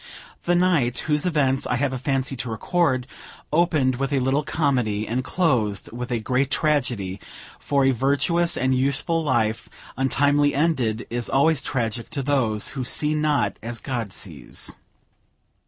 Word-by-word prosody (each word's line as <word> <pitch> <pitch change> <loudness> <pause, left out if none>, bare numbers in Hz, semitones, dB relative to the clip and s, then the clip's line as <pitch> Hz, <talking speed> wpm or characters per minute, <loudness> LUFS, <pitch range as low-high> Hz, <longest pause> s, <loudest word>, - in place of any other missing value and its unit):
The 175 - +3
night 165 -10 +2
whose 150 +2 0
events 135 -5 +1
I - - 0
have 135 +1 0
a 130 - -3
fancy 135 0 -1
to 120 - -3
record, 130 - 0 0.5
opened 155 -6 +2
with 135 +1 -2
a 140 - +2
little 135 +3 +1
comedy, 125 -9 0
and 125 +3 -1
closed 125 - 0
with 125 +2 -6
a 120 - 0
great 130 +4 0
tragedy; 125 - 0 0.4
for 140 -2 +1
a 135 - +5
virtuous 145 +7 +1
and 130 +1 +1
useful 140 +5 0
life 115 -6 0 0.3
untimely 145 +2 +2
ended 130 -7 0
is 120 0 -2
always 140 +1 +3
tragical 120 -4 -2
to 140 - -3
those 125 -7 0
who 135 -2 -4
see 150 +4 +1
not 150 -9 +1
as 115 +1 -5
God 120 -6 -4
sees. 80 -10 -5
135 Hz, 155 wpm, -23 LUFS, 120-145 Hz, 0.5 s, a